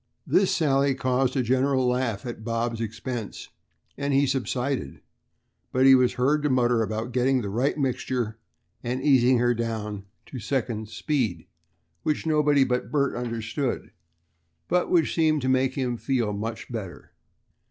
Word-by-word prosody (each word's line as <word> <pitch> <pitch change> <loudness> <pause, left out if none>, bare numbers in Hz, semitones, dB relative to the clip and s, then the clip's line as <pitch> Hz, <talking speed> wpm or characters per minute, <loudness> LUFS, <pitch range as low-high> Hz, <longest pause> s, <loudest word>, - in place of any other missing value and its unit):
This 195 - +3
sally 140 -3 +2
caused 130 +1 0
a 130 - +2
general 130 +1 +2
laugh 125 -4 -1
at 120 -3 -6
Bob's 115 0 -2
expense 115 0 -5 0.5
and 140 -1 0
he 140 +1 +4
subsided, 130 - -2 0.7
but 130 +1 +3
was 125 -1 +3
heard 145 +4 +2
to 150 - 0
mutter 120 -3 +2
about 110 +2 -3
"getting 130 +1 +2
the 100 - -4
right 130 +8 0
mixture," 125 -4 -2 0.4
and 125 +2 -3
"easing 130 -3 +5
her 120 0 +3
down 110 -3 -4 0.2
to 130 - -8
second 110 -2 -2
speed," 115 - -2 0.6
which 155 0 -1
nobody 150 -3 +3
but 125 -1 -1
Bert 140 -2 +1
understood, 120 +2 -3 0.8
but 180 0 +1
which 165 -4 +2
seemed 155 -4 +2
to 130 - +1
make 130 0 +2
him 125 -3 -1
feel 120 -5 -1
much 110 +4 -5
better. 105 -7 -7
125 Hz, 145 wpm, -25 LUFS, 115-135 Hz, 0.8 s, easing